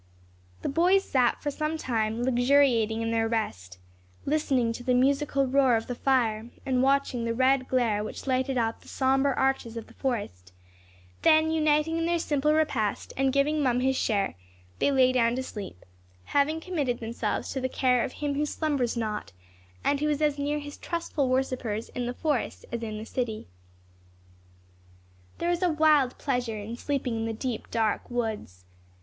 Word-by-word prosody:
The - - -1
boys 360 +6 +3
sat 250 -8 +1
for 290 - -1
some 305 +2 -2
time 225 -4 -1
luxuriating 245 -3 +3
in 225 - -1
their 225 0 +1
rest, 95 - -3 0.5
listening 270 -6 +1
to 245 - -8
the 250 0 +2
musical 275 +2 +2
roar 260 -2 +3
of 225 - -1
their 245 - -4
fire, 235 -4 +1 0.2
and 255 -2 +1
watching 270 -3 +1
the 230 0 -1
red 260 +1 +3
glare 230 -5 +1
which 215 - -7
lighted 260 0 0
up 230 -1 -1
the - - -19
sombre 270 +1 +2
arches 265 -4 0
of 230 - -6
the - - -18
forest; 95 - -4 0.7
then 315 0 +5
uniting 310 0 +2
in 330 - 0
their 345 0 +2
simple 300 -2 +1
repast, 290 -9 0
and 270 0 +2
giving 290 +3 +2
Mum 250 -3 +2
his 265 +1 +2
share, 205 -6 0 0.5
they - - +3
lay 260 -2 +4
down 235 -2 +2
to 260 - -2
sleep, 200 - -8 0.4
having 285 - +1
committed 295 -9 -2
themselves 230 +1 -3
to 265 - -3
the 260 - -1
care 250 -2 +2
of - - -4
Him 290 -1 -2
who 290 +2 0
slumbers 280 -7 -1
not, 210 - -3 0.5
and 285 - +1
who 300 +1 0
is 295 -1 0
as 295 -2 +1
near 290 +1 0
his 290 0 -7
trustful 335 -5 -2
worshippers 255 -4 -1
in 245 -1 -4
the 245 - -4
forest 295 -5 -2
as 235 - -3
in 215 -2 -4
the 215 - -6
city. 230 -3 -3 1.9
There 345 - 0
is 350 +1 -1
a 360 - +3
wild 305 -5 +3
pleasure 245 -5 -2
in 210 +3 -6
sleeping 250 -2 -2
in 225 - -2
the 225 - -2
deep 235 0 -4
dark 220 -2 0
woods. 220 - -4
255 Hz, 180 wpm, -27 LUFS, 230-285 Hz, 1.9 s, then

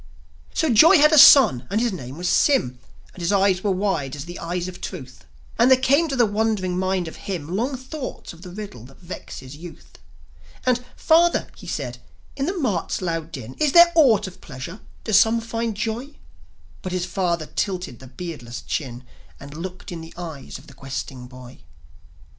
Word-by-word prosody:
So 315 -7 +2
Joi 330 - +8
had 300 +1 +6
a 310 - +5
son, 225 - +8
and 210 - 0
his 235 -2 0
name 130 -5 -7
was 180 +1 -3
Sym; 125 - +2 0.3
And 180 - -11
his 170 - 0
eyes 195 -2 +2
were 205 - +1
wide 185 -8 -1
as 145 0 -7
the 175 +1 -8
eyes 175 +1 -3
of 185 - -9
Truth; 130 -9 -8 0.3
And 240 +2 +5
there 260 - +7
came 280 +5 +3
to 275 - -2
the 245 -2 +4
wondering 205 -3 -1
mind 185 -1 -1
of 160 - -9
him 165 -6 -4
Long 255 +6 -1
thoughts 260 - -7
of 165 - -16
the 180 - -9
riddle 185 - -8
that 135 +1 -16
vexes 145 -6 -9
youth. 170 +2 -13 0.7
And, 250 -1 +2
"Father," 340 +2 +3
he - - -13
said, - - -4 0.4
"in 275 +1 -2
the 375 +2 -2
mart's 215 - -1
loud 165 -3 -3
din 130 -4 -8
Is 300 -3 +2
there 345 0 +8
aught 275 - +5
of 185 -1 -10
pleasure? 150 - -8 0.2
Do 220 - -3
some 225 +3 +5
find 230 -1 -3
joy?" 230 +6 -4 0.7
But 185 - -5
his 180 -1 -1
father 175 -3 -1
tilted 180 - -3
the 130 - -12
beardless 125 -5 -8
chin, 125 -4 -4 0.4
And 140 +1 -11
looked 180 +4 -7
in 170 -2 -6
the 160 0 -12
eyes 160 -6 -7
of 130 - -16
the 140 - -15
questing 135 -1 -7
boy. 125 0 -13
185 Hz, 190 wpm, -23 LUFS, 150-230 Hz, 0.7 s, Joi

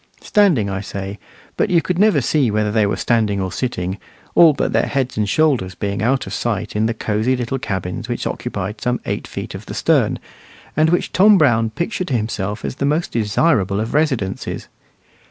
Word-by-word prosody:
Standing 175 - +3
I 95 -1 -3
say, 100 0 -6 0.4
but - - +1
you 175 - +4
could 180 +1 -2
never 205 -8 +4
see 135 0 +2
whether 105 0 0
they 110 -1 +2
were 100 - 0
standing 110 -4 +1
or 95 -1 -2
sitting, 95 -3 -3 0.3
all 165 -2 +7
but - - -1
their - - +2
heads 135 -2 -1
and 105 -1 0
shoulders 130 - +1
being 100 +3 -3
out 130 +4 +1
of - - -7
sight - - -2
in 110 +1 +2
the 115 - -2
cozy 110 +4 0
little 125 +2 -2
cabins 100 +4 -4
which 120 - -3
occupied 105 -3 -4
some 125 0 0
eight - - -3
feet - - -6
of - - -9
the - - -6
stern, - - +2 0.6
and 155 +1 +3
which 175 - 0
Tom 205 +2 +6
Brown 115 -8 +3
pictured 175 - -3
to 125 - +1
himself 105 -1 -3
as - - -4
the - - -3
most 150 +4 0
desirable 105 - +1
of 110 +2 -3
residences. 130 -11 -1
115 Hz, 195 wpm, -19 LUFS, 105-145 Hz, 0.6 s, all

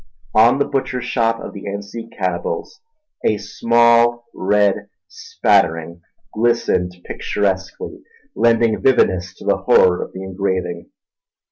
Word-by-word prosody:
On 115 +4 +5
the 140 - +1
butcher's 130 -2 -2
shop 115 -2 0
of - - -8
the 100 - -9
Anzique 100 +3 -7
cannibals 85 -2 -3 0.4
a 110 - +2
small 120 +2 +3
red 100 0 +1 0.2
spattering 85 +1 0 0.3
glistened 110 -6 0
picturesquely, 95 -2 -3 0.3
lending 115 -1 +2
vividness 95 -8 +2
to - - -13
the - - +2
horror 90 -1 +4
of - - -6
the 95 - -7
engraving. 95 -1 -3
105 Hz, 115 wpm, -19 LUFS, 95-115 Hz, 0.4 s, On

